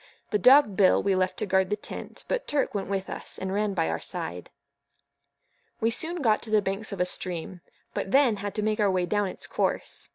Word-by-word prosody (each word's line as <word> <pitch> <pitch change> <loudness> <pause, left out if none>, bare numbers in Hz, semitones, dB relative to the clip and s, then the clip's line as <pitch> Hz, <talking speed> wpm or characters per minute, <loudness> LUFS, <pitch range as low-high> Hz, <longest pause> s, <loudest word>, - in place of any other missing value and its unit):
The 210 - +2
dog 255 -5 +6
Bill 190 -2 +4
we 200 - +2
left 185 0 0
to - - -1
guard 190 -1 +2
the 210 - +1
tent, 210 - -8
but - - -2
Turk 290 -2 0
went 200 -2 -3
with 195 -1 -2
us, - - -5
and 190 0 -4
ran 205 -1 0
by 165 -3 +1
our - - -2
side. 85 +2 -5 1.3
We 225 +1 +1
soon 325 +6 +1
got 215 -3 +3
to 225 - -6
the 215 0 +4
banks 200 +2 -2
of 200 - -6
a 180 - +3
stream; 180 -1 -4 0.3
but - - -3
then 255 -2 +4
had 205 0 -5
to 210 - -1
make 215 0 0
our 205 -1 +3
way 185 -1 +1
down 205 +2 0
its - - -6
course. - - -2
205 Hz, 225 wpm, -27 LUFS, 190-215 Hz, 1.3 s, dog